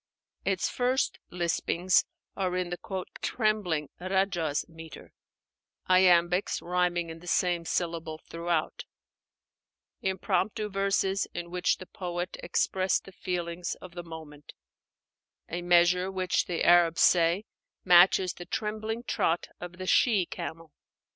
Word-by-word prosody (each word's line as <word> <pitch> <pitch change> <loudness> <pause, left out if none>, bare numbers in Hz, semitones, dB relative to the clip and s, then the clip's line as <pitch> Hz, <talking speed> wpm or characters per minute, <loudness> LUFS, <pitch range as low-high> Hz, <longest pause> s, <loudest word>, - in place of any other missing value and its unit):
Its - - +1
first 255 +2 0
lispings 175 +1 +1 0.3
are 185 -2 -1
in 180 -1 -2
the 185 +1 -4 0.2
"trembling" 205 - 0
(rájaz) 180 -5 0
metre, 160 -1 -12 0.7
iambics, 180 0 +4
rhyming 175 -1 0
in 160 - -9
the 175 - -14
same 175 -1 +1
syllable 165 -2 -2
throughout; 165 0 -3 1.2
impromptu 195 +2 -1
verses, 195 0 +1
in 175 0 -5
which 180 0 +1
the 185 - -9
poet 180 -2 -5
expressed 190 0 0
the 195 - -12
feelings 175 -1 -3
of 185 - -12
the 175 - -6
moment: 160 -3 -11 0.9
a 175 +2 -4
measure 175 +1 +4
which, 185 -1 0
the 175 -2 -1
Arabs 170 -1 +5
say, 175 +4 +4 0.4
matches 180 +1 +6
the 175 - -9
trembling 220 +2 -3
trot 170 -7 0
of 175 0 -8
the 185 - -6
she 205 -1 +3
camel. 165 -2 -7
180 Hz, 120 wpm, -28 LUFS, 170-190 Hz, 1.2 s, matches